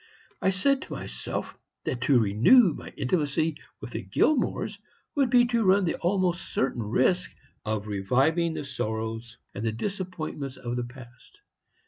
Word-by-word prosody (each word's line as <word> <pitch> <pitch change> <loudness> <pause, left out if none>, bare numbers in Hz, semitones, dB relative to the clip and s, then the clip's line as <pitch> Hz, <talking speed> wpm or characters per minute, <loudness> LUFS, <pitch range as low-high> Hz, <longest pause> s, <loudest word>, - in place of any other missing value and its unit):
I - - +3
said 265 +9 +2
to - - -7
myself - - -5 0.3
that 125 - -3
to 135 0 +4
renew 125 - +5
my - - -9
intimacy 155 +1 0 0.2
with - - -8
the - - -4
Gilmores 300 -5 +1 0.3
would 275 -3 +2
be 245 0 +6
to 235 -2 +1
run 190 0 +4
the 165 - +1
almost 180 -1 0
certain 130 -2 0
risk 130 - +1 0.3
of 105 -1 -2
reviving 135 - +1
the 150 -2 -4
sorrows 115 -1 -4 0.2
and 105 - -5
the 115 - +1
disappointments 160 - -4
of 120 0 -4
the 125 -1 -2
past. 130 - -14
150 Hz, 150 wpm, -27 LUFS, 120-190 Hz, 0.3 s, be